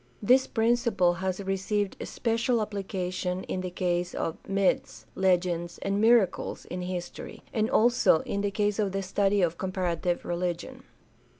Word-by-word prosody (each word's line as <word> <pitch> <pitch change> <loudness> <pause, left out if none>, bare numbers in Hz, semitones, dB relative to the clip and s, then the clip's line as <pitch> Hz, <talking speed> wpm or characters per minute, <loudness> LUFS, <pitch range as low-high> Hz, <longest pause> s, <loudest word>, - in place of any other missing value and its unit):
This 255 +5 +4
principle 225 -6 +2
has 190 0 -1
received 195 +1 -1
special 230 +1 0
application 190 -3 -3
in 185 - -3
the 185 - -3
case 175 0 -1
of 165 - -2
myths, 195 -1 0
legends, 175 -2 +1
and 200 +1 0
miracles 225 -3 +2
in 180 +1 -5
his 180 -1 -3
tory, - - -10
and 220 0 +1
also 240 -9 +4
in 200 - -3
the 205 - 0
case 205 +1 0
of 200 -3 0
the 195 0 -1
study 195 +1 +1
of 170 -1 0
comparative 180 -2 -1
religion. 175 0 -3
190 Hz, 145 wpm, -28 LUFS, 180-205 Hz, -, This